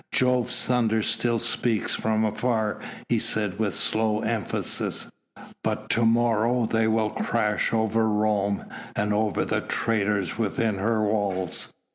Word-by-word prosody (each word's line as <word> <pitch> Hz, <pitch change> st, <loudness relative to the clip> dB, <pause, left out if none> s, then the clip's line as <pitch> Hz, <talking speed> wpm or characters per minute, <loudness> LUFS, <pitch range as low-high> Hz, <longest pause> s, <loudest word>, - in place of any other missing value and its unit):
"Jove's 125 Hz, -1 st, +2 dB
thunders 110 Hz, -3 st, +1 dB
still 120 Hz, -1 st, +1 dB
speak 115 Hz, -1 st, -1 dB
from 110 Hz, 0 st, 0 dB
afar," 110 Hz, 0 st, -1 dB, 0.3 s
he -, -, +2 dB
said 105 Hz, -3 st, -1 dB
with 105 Hz, -4 st, 0 dB
slow 110 Hz, -1 st, +1 dB
emphasis, 110 Hz, -3 st, -2 dB, 0.5 s
"but -, -, -2 dB
to 115 Hz, -, +2 dB
morrow 115 Hz, +1 st, +2 dB
they 110 Hz, 0 st, +1 dB
will 110 Hz, -1 st, +1 dB
crash 105 Hz, -2 st, 0 dB
over 110 Hz, 0 st, +1 dB
Rome 105 Hz, -1 st, 0 dB, 0.3 s
and 105 Hz, 0 st, 0 dB
over 105 Hz, 0 st, 0 dB
the -, -, 0 dB
traitors 105 Hz, -3 st, -1 dB
within 110 Hz, -1 st, 0 dB
her 110 Hz, +2 st, +1 dB
walls. 100 Hz, -4 st, -1 dB
110 Hz, 130 wpm, -25 LUFS, 105-115 Hz, 0.5 s, Jove's